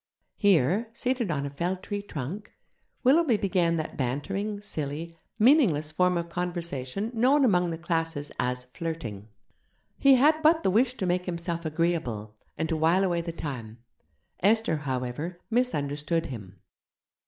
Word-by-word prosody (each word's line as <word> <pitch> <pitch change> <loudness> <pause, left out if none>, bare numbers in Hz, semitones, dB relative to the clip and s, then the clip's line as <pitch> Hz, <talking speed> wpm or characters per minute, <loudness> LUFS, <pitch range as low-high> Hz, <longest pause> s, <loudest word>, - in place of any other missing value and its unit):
Here, 200 - +3
seated 245 -3 -1
on 140 -3 -1
a 140 - -4
felled 180 +6 -2
tree 205 0 -3
trunk, 190 +3 -6 0.5
Willoughby 270 -2 +4
began 180 -4 +1
that 155 +2 -4
bantering, 195 - -2
silly, 165 -4 -5 0.2
meaningless 215 - +4
form 180 +2 +2
of 170 0 -2
conversation 175 - -3
known 260 +5 +4
among 180 -6 +3
the 165 - -3
'classes' 165 -3 -2
as 125 0 -1
flirting. 135 - -5 0.7
He 275 -1 +7
had 305 +5 +4
but 320 +1 +4
the 190 - +3
wish 245 +5 +3
to 190 - -2
make 180 0 0
himself 170 -1 -3
agreeable, 155 -10 -1 0.2
and 160 - -1
to 160 - -1
while 165 +5 +3
away 175 -3 +1
the 170 0 -4
time. 125 -9 -6 0.6
Esther, 210 -4 +3
however, 145 +5 -4
misunderstood 165 - 0
him. 100 -7 -8
170 Hz, 140 wpm, -27 LUFS, 145-205 Hz, 0.7 s, He